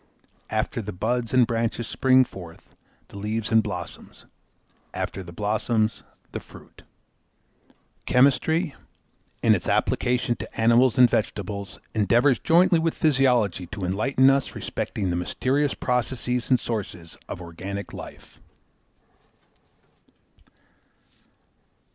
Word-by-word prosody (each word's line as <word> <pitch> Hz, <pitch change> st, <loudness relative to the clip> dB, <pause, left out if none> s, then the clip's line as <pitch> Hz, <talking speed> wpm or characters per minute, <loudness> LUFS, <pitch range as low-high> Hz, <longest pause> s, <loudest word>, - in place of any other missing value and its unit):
After 110 Hz, +2 st, -1 dB
the 105 Hz, 0 st, -6 dB
buds 115 Hz, +5 st, -2 dB
and 125 Hz, -1 st, +5 dB
branches 115 Hz, 0 st, -2 dB
spring 130 Hz, -1 st, +4 dB
forth 85 Hz, -6 st, -12 dB, 0.4 s
the 100 Hz, -, -9 dB
leaves 110 Hz, +2 st, -2 dB
and 110 Hz, 0 st, +5 dB
blossoms, 90 Hz, -5 st, -8 dB, 0.7 s
after 95 Hz, -, -3 dB
the 85 Hz, -2 st, -10 dB
blossoms 110 Hz, +3 st, 0 dB, 0.3 s
the -, -, -4 dB
fruit. -, -, -16 dB, 1.3 s
Chemistry, 140 Hz, +5 st, +3 dB, 0.7 s
in -, -, +6 dB
its -, -, -2 dB
application 125 Hz, -1 st, +1 dB
to -, -, -9 dB
animals 120 Hz, +2 st, +4 dB
and 125 Hz, -1 st, +8 dB
vegetables, 100 Hz, -3 st, -3 dB
endeavours 120 Hz, +5 st, +3 dB
jointly 175 Hz, +1 st, +4 dB
with 165 Hz, 0 st, 0 dB
physiology 125 Hz, -, +2 dB
to 100 Hz, +1 st, -5 dB
enlighten 130 Hz, +8 st, +2 dB
us 135 Hz, -1 st, -1 dB
respecting 95 Hz, -4 st, -3 dB
the -, -, -1 dB
mysterious 130 Hz, +11 st, 0 dB
processes 125 Hz, 0 st, -1 dB
and 130 Hz, -2 st, +4 dB
sources 90 Hz, -7 st, -5 dB
of -, -, -5 dB
organic 95 Hz, +4 st, -7 dB
life. -, -, -11 dB
115 Hz, 110 wpm, -24 LUFS, 100-130 Hz, 1.3 s, and